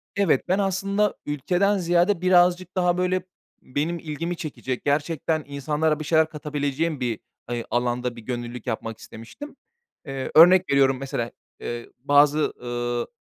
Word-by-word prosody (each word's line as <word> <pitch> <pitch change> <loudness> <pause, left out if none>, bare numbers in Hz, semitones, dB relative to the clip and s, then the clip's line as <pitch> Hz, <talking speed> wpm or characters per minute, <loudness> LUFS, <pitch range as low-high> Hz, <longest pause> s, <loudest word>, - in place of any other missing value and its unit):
Evet, 190 -9 +2
ben 185 +3 +2
aslında 195 +1 0
ülkeden 180 +8 +1
ziyade 175 +1 +2
birazcık 180 0 +3
daha, 180 -1 +2
böyle, 180 0 0 0.4
benim 155 +6 -2
ilgimi 165 +3 -4
çekecek, 130 -5 -5
gerçekten 155 +2 0
insanlara 150 +2 -1
bir 155 - -5
şeyler 160 +1 +3
katabileceğim 150 0 -2
bir, 120 -4 -2 0.3
hani, 120 -1 -3
alanda 120 0 -1
bir 115 - -10
gönüllülük 120 +1 -6
yapmak 115 -1 -3
istemiştim. 195 - -11 0.5
Eee, 135 -2 -5
örnek 180 +3 +7
veriyorum, 135 -1 +4
mesela, 120 -3 -3 0.3
eee, 120 0 -6
bazı, 145 +3 +3
ııı, 120 0 -2
150 Hz, 135 wpm, -24 LUFS, 130-175 Hz, 0.5 s, örnek